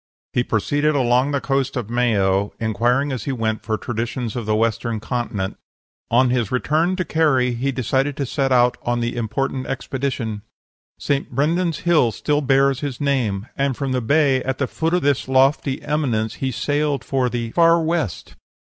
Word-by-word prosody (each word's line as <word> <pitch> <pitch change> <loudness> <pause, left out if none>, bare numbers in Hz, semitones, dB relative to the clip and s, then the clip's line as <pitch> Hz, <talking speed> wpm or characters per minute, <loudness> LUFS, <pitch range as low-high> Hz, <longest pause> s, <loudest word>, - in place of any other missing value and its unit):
"He - - +2
proceeded 145 +8 0
along 125 0 +2
the 140 -1 0
coast 135 -1 -1
of 115 -2 -4
Mayo, 100 -5 +1
inquiring 120 +6 +1
as 130 - -4
he 140 - -1
went 110 -3 -1
for 110 -1 -2
traditions 120 0 -4
of 120 -3 -4
the 110 - +2
Western 115 0 0
continent. 110 -5 -3 0.5
On 125 +1 +3
his 120 -5 0
return 155 +8 +1
to 185 -1 -2
Kerry 135 -6 +2
he 130 +4 -1
decided 135 +2 -1
to 140 - -1
set 135 +1 -1
out 125 -1 +4
on 120 0 -1
the 120 +1 -2
important 130 +3 -2
expedition. 125 -5 -3 0.6
St. 140 -1 -1
Brendan's 165 +2 0
Hill 165 -9 +3
still 145 +7 0
bears 135 -1 +3
his 140 -4 -4
name; 120 -8 0
and 140 -2 0
from 135 -2 -2
the 130 -1 0
bay 140 +1 +3
at 130 0 -2
the 140 - 0
foot 165 +6 -1
of 180 - 0
this 140 -2 +1
lofty 135 +1 +2
eminence 120 -7 -1
be 135 -1 -2
sailed 145 +2 -1
for 130 -2 0
the 115 -1 -3
'Far 165 +2 +5
West.' 160 - -2
130 Hz, 175 wpm, -21 LUFS, 115-140 Hz, 0.6 s, Far